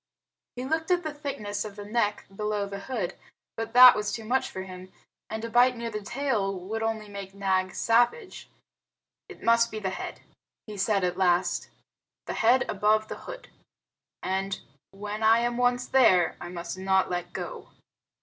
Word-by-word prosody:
He 250 +1 -5
looked 320 +4 -1
at 355 -1 +2
the 310 -1 -4
thickness 215 -9 -4
of 210 -2 -8
the 205 -1 -8
neck 210 -1 0
below 210 0 -1
the 200 0 -6
hood, 210 -5 -3 0.4
but 225 +1 -5
that 250 0 +10
was 210 0 -2
too 225 - -5
much 255 +4 0
for 190 - -6
him; 185 0 -10 0.4
and 220 +1 -4
a - - -5
bite 245 +1 +4
near 230 0 -4
the 210 -1 -4
tail 210 -5 -1
would 215 +5 -4
only 225 -1 -2
make 200 -1 -8
Nag 190 -1 0
savage. 240 - +1 0.8
"It - - -12
must 230 0 +4
be 215 - -6
the 195 -3 -2
head"' - - -6 0.4
he 215 - -8
said 200 0 +1
at 180 +1 -1
last; 175 -1 +1 0.6
"the - - -4
head 245 +3 +3
above 215 +2 +1
the - - -5
hood. - - -9 0.7
And, 195 +1 -2 0.3
when 205 +2 -6
I 220 +1 +6
am 240 0 -1
once 245 0 +2
there, 205 -10 +4
I 175 - -6
must 175 +1 -6
not 190 -1 +2
let 175 0 -3
go." - - -7
210 Hz, 180 wpm, -27 LUFS, 195-240 Hz, 0.8 s, that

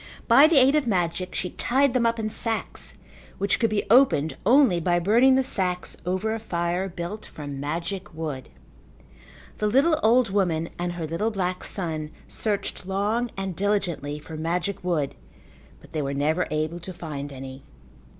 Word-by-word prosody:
By 290 +3 +8
the 320 -2 +3
aid 265 +1 +6
of 300 -4 +2
magic 180 -3 -1
she 180 - -2
tied 270 +1 +2
them 240 -2 +3
up 230 0 0
in 215 -1 -2
sacks 225 +1 -3 0.4
which 200 0 +1
could 230 - +2
be 210 -1 0
opened 230 - +5
only 245 -8 +5
by 175 +1 +2
burning 235 +9 +5
the 265 - +3
sacks 180 -7 -2
over 190 +5 0
a 225 - -3
fire 175 -2 -2
built 175 +4 -6
from 145 -2 -7
magic 170 +7 -4
wood. 155 -5 -5 1.1
The 210 - +1
little 280 +8 +3
old 230 0 +4
woman 170 -5 +1
and 175 0 -2
her 170 -2 -4
little 165 +8 -1
black 185 -4 -2
son 160 -5 -3 0.2
searched 205 -3 -3
long 210 +5 0
and 195 -2 -3
diligently 175 -7 -1
for 150 +1 -9
magic 175 +5 -2
wood, 160 -6 0 0.7
but - - -17
they 155 - -2
were 140 0 -2
never 155 +5 +1
able 155 +2 -2
to 185 +2 -8
find 145 -4 -6
any. 135 0 -8
185 Hz, 170 wpm, -25 LUFS, 160-220 Hz, 1.1 s, By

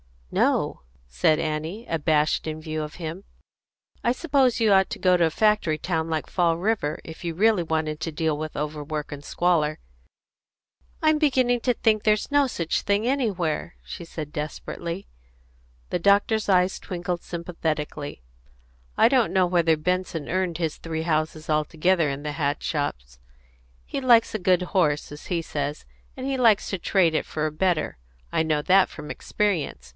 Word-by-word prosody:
"No," - - +1 0.3
said 65 - +2
Annie, 160 +8 -3
abashed 155 -1 +1
in 155 0 -4
view 155 -1 -3
of 150 - -8
him. 170 +3 -6 0.8
"I 240 - +2
suppose 265 -5 +2
you 220 -2 +4
ought 190 -1 +5
to - - -3
go 180 -1 +3
to 170 - +4
a - - +2
factory 210 -3 +2
town 160 -1 -2
like 160 -2 -2
Fall 170 -2 +1
River, 190 -5 -1
if 160 +2 -10
you 165 -1 -2
really 210 -1 +3
wanted 155 -1 -1
to 165 - -4
deal 160 0 0
with 155 0 -5
overwork 150 0 -4
and 145 -1 -7
squalor." 155 -3 +1 1.3
"I'm 310 -1 +4
beginning 255 -5 +3
to 250 - +2
think 220 -2 +2
there's 215 +4 +1
no 285 -1 +4
such 170 -9 -1
thing 205 +2 +1
anywhere," 195 - -1
she 170 - -8
said 155 -2 -7
desperately. 170 +4 -5 0.8
The - - -1
doctor's 205 +4 +3
eyes 185 -1 +3
twinkled 180 -1 -4
sympathetically. 155 - -4 0.7
"I - - +6
don't 255 -4 +2
know 185 -1 +4
whether 170 -2 +3
Benson 180 -2 -2
earned 185 -2 0
his 160 -3 -2
three 160 -1 -4
houses 155 -1 -1
altogether 155 +2 +2
in 140 +1 -4
the 150 - -3
hat 145 -1 -1
shops. 60 - -3 0.7
He - - -4
'likes 240 -3 +4
a 215 - -1
good 180 -1 +3
horse,' 150 -8 +1
as 145 - -10
he 170 -2 0
says; 145 -2 -4 0.3
and 260 - -6
he 270 -1 -1
likes 230 -5 +4
to 195 - -3
trade 175 -3 +2
it 155 - 0
for 155 0 -3
a 155 - -1
better; 165 - 0 0.3
I 160 - +2
know 155 -2 +1
that 190 +3 +5
from 150 0 -8
experience. 160 - -2
170 Hz, 170 wpm, -25 LUFS, 155-200 Hz, 1.3 s, I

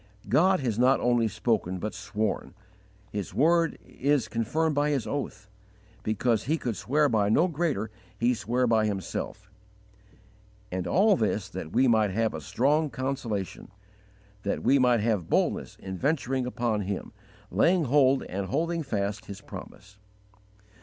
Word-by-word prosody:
" - - -18
God 185 0 +4
has 120 -4 -1
not 130 +2 +4
only 120 -2 +2
spoken, 105 -3 -1
but 105 +3 -4
sworn; 105 +1 -3 0.6
His 100 -2 -5
word 165 +3 +3
is 140 -1 0
confirmed 150 +8 0
by 145 +1 +1
His 135 -6 0
oath: 110 -4 -4 0.5
because 110 +1 0
He 155 +4 +1
could 120 -7 -3
swear 150 +7 +2
by 105 -5 +2
no 160 +11 +4
greater 150 - -1 0.3
He 120 +2 +2
sware 120 +3 0
by 110 -2 +3
Himself. 100 -3 -4 1.2
And 90 0 -2
all 205 +3 +4
this 110 - -1
that 85 -4 -6
we 130 +5 +3
might 110 -3 +4
have 110 +3 0
a 80 - -5
strong 145 - +1
consolation; 130 -8 -3 0.7
that 100 - -2
we 135 +3 +4
might 125 -3 +4
have 105 -6 0
boldness - - 0
in 95 -1 -6
venturing 135 -3 0
upon 120 -4 -1
Him, 100 +1 -4 0.4
laying 175 0 +3
hold 135 -1 +3
and 95 +1 -4
holding 165 - -1
fast 100 -6 -2
His 100 -1 -8
promise. 100 0 -11
120 Hz, 150 wpm, -27 LUFS, 105-140 Hz, 1.2 s, God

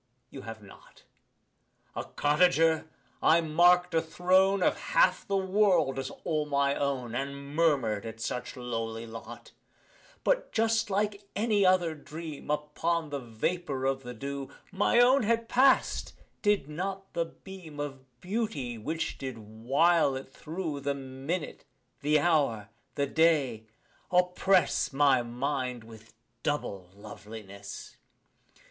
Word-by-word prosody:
You 135 - -8
have 110 -2 -9
not: 95 - -17 0.9
A - - -3
cottager, 160 +1 +2 0.3
I 165 +1 +5
mark'd 175 +3 +4
a 165 - +3
throne 185 +4 +3
Of - - +3 0.2
half - - +4
the 195 - +1
world 190 -8 +2
as 130 0 -3
all 155 -2 -1
my 140 -1 +2
own, 135 -5 -2
And 140 +2 -5
murmur'd 135 -11 +2
at 115 0 -8
such 125 +2 -4
lowly 115 -2 -4
lot 115 0 -10 0.7
But, - - +1
just 225 -1 +1
like 200 0 -1
any 210 -1 +2
other 180 -3 +3
dream, 155 0 -8
Upon 150 +2 -1
the 140 - -2
vapour 135 +4 -3
of 135 0 0
the 125 -1 -8
dew 140 +2 -5 0.2
My 205 +5 +3
own 255 +3 +6
had 230 +1 +1
past, 265 +3 +3 0.3
did 205 -9 +2
not 190 +5 -5
the 170 - 0
beam 170 -4 -11
Of 135 -4 -7
beauty 180 - -3
which 160 +7 -3
did 130 -3 -5
while 135 +8 +2
it 130 0 -8
thro' 160 -2 -5
The 140 0 -1
minute 135 +5 -5 0.4
the 150 +1 +3
hour 140 -11 +1 0.3
the 140 - +1
day 140 -8 +2 0.4
oppress 180 -2 +2
My 135 -2 +4
mind 125 0 -3
with 110 0 -15 0.3
double 100 -12 -3
loveliness. 100 -1 -10
150 Hz, 130 wpm, -29 LUFS, 130-180 Hz, 0.9 s, own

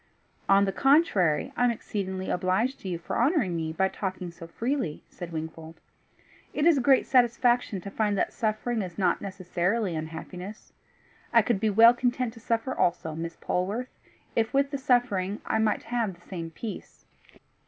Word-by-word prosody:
"On 195 0 +6
the 195 - 0
contrary, 205 - +3
I - - +1
am - - +4
exceedingly 190 -4 -3
obliged 190 +9 0
to 190 - -6
you 175 - -2
for 165 - -4
honouring 245 - +2
me 160 -1 -2
by 190 +4 +1
talking 185 -2 -4
so 165 0 -11
freely," 230 - -2
said 175 -1 -8
Wingfold. 160 0 -7 0.8
"It 295 - +1
is 335 -2 +6
a 270 - +1
great 265 +1 +4
satisfaction 240 -4 +3
to 200 - -7
find 210 -1 0
that - - 0
suffering 220 +1 -1
is 180 -3 -6
not 180 -4 +1
necessarily 185 +1 -1
unhappiness. 175 +6 -7 0.6
I - - +6
could 235 -5 +1
be 220 - +1
well 225 +3 +7
content 245 -1 -1
to 230 - -13
suffer 230 +3 -1
also, 165 -2 0
Miss 165 +1 -5
Polwarth, 205 +8 -2 0.4
if 225 +3 0
with 275 0 +2
the 280 - -3
suffering 235 -7 +1
I - - 0
might 220 -1 +1
have 230 -6 -2
the 175 - -24
same 170 -3 -5
peace." 210 +7 -8
200 Hz, 175 wpm, -27 LUFS, 180-240 Hz, 0.8 s, well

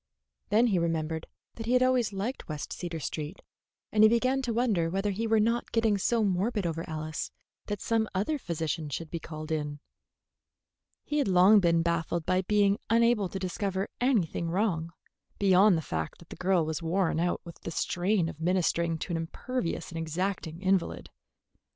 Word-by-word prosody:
Then 225 +3 +4
he 200 -7 +2
remembered 160 -1 -1 0.3
that 225 -1 -7
he 245 - +2
had 250 0 +5
always 255 -4 +2
liked 205 +5 -4
West 150 -1 -4
Cedar 170 -2 -5
Street, 155 +4 -5 0.5
and 215 - +3
he 215 - +9
began 255 +4 +2
to 250 -3 -2
wonder 220 -8 +1
whether 195 +3 0
he 225 +4 -2
were 220 0 +3
not 230 +3 +1
getting 225 -3 +2
so 230 +3 +2
morbid 200 +2 0
over 165 -1 -2
Alice 155 0 -4 0.4
that 205 -2 -3
some 225 -1 +1
other 280 +11 0
physician 160 - -3
should 155 +3 -5
be 170 - -3
called 155 0 -7
in. 150 -2 -2 1.2
He 295 - -1
had 285 - +1
long 190 +3 +6
been 170 -3 +3
baffled 170 0 -1
by 185 0 +2
being 205 +1 +2
unable 230 -4 +3
to 195 - -5
discover 190 +1 -2
anything 200 - +1
wrong, 170 -3 0 0.5
beyond 195 -1 +5
the 160 - -3
fact 80 - -4
that 170 - -17
the - - -8
girl 185 -3 +2
was 160 +1 -3
worn 170 0 +1
out 175 +1 0
with 170 - -10
the - - -6
strain 180 +2 0
of 165 -1 -8
ministering 170 -1 +1
to 175 - -4
an - - 0
imperious 170 +5 -3
and 165 - -4
exacting 165 +1 -3
invalid. 190 -2 0
185 Hz, 180 wpm, -29 LUFS, 165-215 Hz, 1.2 s, he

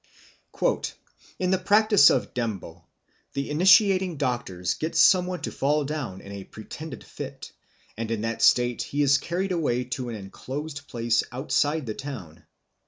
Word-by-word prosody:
_ - - 0 0.4
"In 185 0 0
the 190 - +2
practice 210 +2 +6
of - - 0
Ndembo 95 -8 -4 0.5
the 140 +1 -3
initiating 185 +1 +5
doctors 120 - -1
get 160 +1 -4
some 180 -2 +5
one 180 -1 -4
to - - -3
fall 145 +1 +1
down 135 -11 -4
in 100 - -11
a 100 -1 -7
pretended 135 +9 -9
fit, - - -8 0.4
and 115 0 -4
in 115 -2 -2
that 115 0 -3
state 120 -1 +4
he 145 +1 -1
is 140 0 +4
carried 185 +5 -2
away 145 -8 0
to 125 0 -4
an 115 - -4
enclosed 140 +9 -7
place 115 -1 +1
outside 145 +3 0
the 110 - -3
town. 95 - -8
140 Hz, 160 wpm, -26 LUFS, 115-165 Hz, 0.5 s, practice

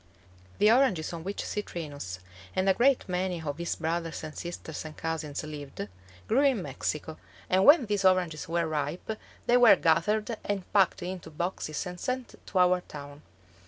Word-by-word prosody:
The 210 - +5
oranges 230 -11 +3
on 165 -1 -6
which 200 +3 -4
Citrinus 145 - -5 0.3
and 185 +1 +1
a 190 - +6
great 260 +5 +3
many 180 -2 -1
of 145 0 -4
his 170 - -1
brothers 165 0 -2
and 155 -1 -7
sisters 170 -3 -6
and 155 -1 -9
cousins 160 -3 -3
lived 145 -8 -6 0.4
grew 245 +5 +3
in 260 -9 +3
Mexico, 150 +3 -4 0.3
and 190 +1 +4
when 290 -3 +8
these 205 -2 0
oranges 180 -5 +2
were 170 0 +1
ripe, 155 +5 -2 0.3
they 245 - +5
were 240 -4 +8
gathered 210 +8 +2
and 200 -3 -3
packed 195 -3 +3
into 180 0 -5
boxes 160 0 -3
and 180 0 -6
sent 255 +3 -3
to 195 - -3
our 180 0 +4
town. 145 -2 -10
175 Hz, 165 wpm, -29 LUFS, 155-200 Hz, 0.4 s, when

